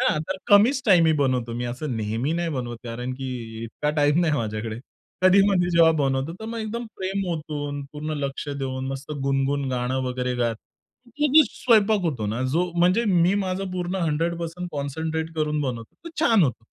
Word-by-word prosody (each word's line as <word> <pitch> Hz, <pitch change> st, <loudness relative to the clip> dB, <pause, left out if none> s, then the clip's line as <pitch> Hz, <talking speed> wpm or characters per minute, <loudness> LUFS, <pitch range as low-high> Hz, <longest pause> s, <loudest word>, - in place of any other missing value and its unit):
हां. 255 Hz, -11 st, +2 dB
तर 190 Hz, -, -1 dB
कमीच 225 Hz, +7 st, +5 dB
टाइम 180 Hz, -5 st, +6 dB
मी 160 Hz, -, +4 dB
बनवतो. 130 Hz, -4 st, 0 dB
मी 120 Hz, +1 st, -3 dB
असं 125 Hz, +2 st, -3 dB
नेहमी 110 Hz, +7 st, -1 dB
नाही 170 Hz, 0 st, -1 dB
बनवत 120 Hz, -2 st, -4 dB
कारण 125 Hz, +2 st, -4 dB
की 120 Hz, -4 st, -6 dB
इतका 150 Hz, +6 st, -2 dB
टाईम 150 Hz, +3 st, +3 dB
नाही 165 Hz, -3 st, +2 dB
माझ्याकडे. 110 Hz, -2 st, -3 dB, 0.4 s
कधी 185 Hz, +1 st, +6 dB
मधi 180 Hz, -3 st, +2 dB
जेव्हा 165 Hz, -1 st, +6 dB
बनवतो. 135 Hz, +2 st, 0 dB
तर -, -, -6 dB
मग 230 Hz, +1 st, -4 dB
एकदम 225 Hz, +2 st, -4 dB
प्रेम 195 Hz, +1 st, -2 dB
ओतून, 145 Hz, -3 st, -4 dB
पूर्ण 155 Hz, +1 st, -4 dB
लक्ष 140 Hz, +1 st, -4 dB
देऊन, 135 Hz, -2 st, -3 dB
मस्त 135 Hz, +2 st, -5 dB
गुणगण 135 Hz, 0 st, 0 dB
गाणं 125 Hz, +1 st, -1 dB
वगैरे 125 Hz, 0 st, -2 dB
गात. 115 Hz, -2 st, 0 dB, 0.5 s
ती 290 Hz, +5 st, 0 dB
जी 315 Hz, -, +10 dB
स्वयंपाक 220 Hz, -3 st, +3 dB
होतो 135 Hz, -11 st, -1 dB
ना, 110 Hz, +5 st, -2 dB
जो 175 Hz, +3 st, +1 dB
म्हणजे 180 Hz, +7 st, +4 dB
मी 180 Hz, -2 st, +3 dB
माझं 185 Hz, 0 st, -3 dB
पूर्ण 180 Hz, +1 st, -2 dB
100% 170 Hz, +3 st, -2 dB
कॉन्सन्ट्रेट 160 Hz, +3 st, -3 dB
करून 150 Hz, -1 st, 0 dB
बनवतो, 120 Hz, -5 st, -4 dB
तो -, -, -6 dB
छान 225 Hz, -, +5 dB
होतो. 125 Hz, -6 st, -1 dB
150 Hz, 180 wpm, -24 LUFS, 130-180 Hz, 0.5 s, जी